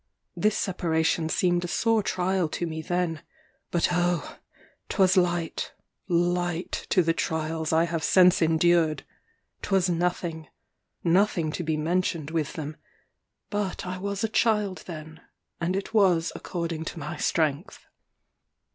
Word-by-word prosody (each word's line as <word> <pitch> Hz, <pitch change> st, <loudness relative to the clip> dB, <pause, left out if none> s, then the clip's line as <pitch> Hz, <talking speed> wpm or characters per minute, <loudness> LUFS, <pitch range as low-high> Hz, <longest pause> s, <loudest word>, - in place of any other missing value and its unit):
This 215 Hz, 0 st, +1 dB
separation 160 Hz, -3 st, 0 dB
seemed 175 Hz, +1 st, +1 dB
a -, -, -2 dB
sore 225 Hz, +4 st, +2 dB
trial 185 Hz, -3 st, 0 dB
to 175 Hz, -, -3 dB
me 160 Hz, -1 st, -4 dB
then; 175 Hz, -1 st, -1 dB, 0.5 s
but 170 Hz, -, +1 dB
oh! 175 Hz, -1 st, 0 dB, 0.5 s
'twas 190 Hz, -2 st, +3 dB
light, 175 Hz, -3 st, 0 dB, 0.3 s
light 175 Hz, 0 st, 0 dB
to 180 Hz, -, +4 dB
the 165 Hz, 0 st, +2 dB
trials 160 Hz, -1 st, -2 dB
I 160 Hz, +1 st, +4 dB
have 170 Hz, -1 st, -2 dB
since 180 Hz, -1 st, +5 dB
endured! 160 Hz, -1 st, +3 dB, 0.6 s
'twas 190 Hz, -2 st, +1 dB
nothing 170 Hz, -2 st, -2 dB, 0.6 s
nothing 175 Hz, -2 st, +2 dB
to 175 Hz, -, -4 dB
be 160 Hz, -2 st, -1 dB
mentioned 165 Hz, -1 st, -1 dB
with 160 Hz, -3 st, -1 dB
them; 155 Hz, -3 st, -6 dB, 0.7 s
but 205 Hz, -3 st, -2 dB
I 180 Hz, 0 st, -4 dB
was 200 Hz, +1 st, -3 dB
a -, -, +3 dB
child 210 Hz, -3 st, +1 dB
then, 160 Hz, -2 st, -8 dB, 0.4 s
and 175 Hz, +2 st, -1 dB
it 195 Hz, +3 st, -4 dB
was 185 Hz, -6 st, +3 dB
according 165 Hz, -2 st, -4 dB
to -, -, -6 dB
my 150 Hz, 0 st, -5 dB
strength. 160 Hz, +5 st, -1 dB
175 Hz, 135 wpm, -26 LUFS, 160-185 Hz, 0.7 s, since